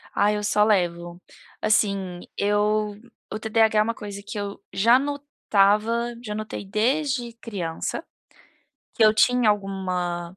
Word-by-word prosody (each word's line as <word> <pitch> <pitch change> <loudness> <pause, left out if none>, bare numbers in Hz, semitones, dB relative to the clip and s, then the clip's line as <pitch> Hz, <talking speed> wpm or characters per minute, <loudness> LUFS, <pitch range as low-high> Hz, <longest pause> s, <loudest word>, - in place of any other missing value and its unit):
Ah, 205 +1 +3
eu 210 0 -2
só 210 0 +3
levo. 175 -4 0 0.4
Assim, 195 -4 +1 0.2
eu 210 0 +1 0.3
o 215 - -4
TDH 220 0 +2
é - - +6
uma 230 +1 -2
coisa 205 -2 -8
que 210 0 -5
eu 200 0 -5
já 230 +5 +5
notava 235 -5 +1
já 210 -2 -5
notei 215 -1 -5
desde 245 +3 0
criança, 195 -8 -5 0.9
que 225 - +4
eu 215 - +6
tinha 240 0 +4
alguma 185 -3 -3
210 Hz, 135 wpm, -24 LUFS, 195-225 Hz, 0.9 s, é